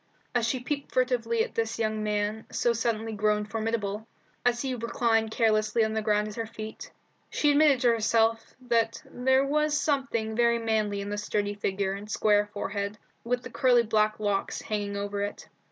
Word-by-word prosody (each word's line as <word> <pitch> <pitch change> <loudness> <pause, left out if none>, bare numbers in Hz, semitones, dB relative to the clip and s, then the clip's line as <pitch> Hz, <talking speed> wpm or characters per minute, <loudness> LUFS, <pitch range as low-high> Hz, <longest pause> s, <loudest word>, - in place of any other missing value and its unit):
As 240 -2 +1
she 255 +2 0
peeped 280 +3 -4
furtively 235 -3 +1
at - - -7
this 225 0 -1
young 215 -1 -1
man, 210 +1 -1
so 240 - +1
suddenly 225 -1 -1
grown 210 0 +1
formidable, 220 -1 -3 0.4
as 240 0 +1
he 265 -1 -1
reclined 230 -1 +1
carelessly 220 0 +2
on 220 - -2
the 220 - 0
ground 210 -1 +1
at 210 - -7
her 225 +1 -4
feet, 220 -1 -8 0.4
she 295 - +2
admitted 285 -3 +4
to 245 - +4
herself 225 0 +1
that 230 -2 0
there 265 +2 +2
was 300 +1 +1
something 265 -7 -1
very 235 0 +3
manly 215 -3 0
in 200 +1 -5
the 205 - -2
sturdy 205 -1 -1
figure 195 -1 -1
and 205 +2 -8
square 210 -1 +3
forehead, 200 0 -3 0.3
with 245 +1 -1
the - - -8
curly 245 -3 +4
black 215 -1 +1
locks 205 -2 -1
hanging 205 -1 -3
over 200 0 -3
it. 205 0 -4
220 Hz, 180 wpm, -28 LUFS, 210-240 Hz, 0.4 s, admitted